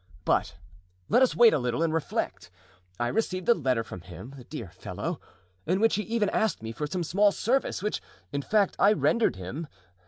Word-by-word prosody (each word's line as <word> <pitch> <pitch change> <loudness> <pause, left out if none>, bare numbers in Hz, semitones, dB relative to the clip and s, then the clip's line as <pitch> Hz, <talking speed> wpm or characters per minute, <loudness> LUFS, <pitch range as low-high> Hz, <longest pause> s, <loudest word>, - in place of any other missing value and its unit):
But - - +1 0.5
let - - +5
us 260 - +4
wait 235 -2 +7
a - - +2
little 125 +5 0
and 165 -1 +1
reflect. 145 - -2 0.5
I 120 - +1
received 185 - -1
a - - +9
letter 130 - 0
from 90 - -9
him, 95 - -10
the 130 - -11
dear 120 - -7
fellow, 90 - -5 0.5
in 185 +4 +2
which 225 +1 +3
he 210 - +1
even 225 -1 0
asked 220 - 0
me 110 - -4
for 150 +6 -4
some 175 +3 -2
small 200 +5 +3
service, 240 -2 0
which, 210 - -1 0.3
in 140 -1 -1
fact, 205 +5 +2
I 205 +2 +6
rendered 230 - +2
him. 105 - -6
165 Hz, 195 wpm, -28 LUFS, -, 0.5 s, a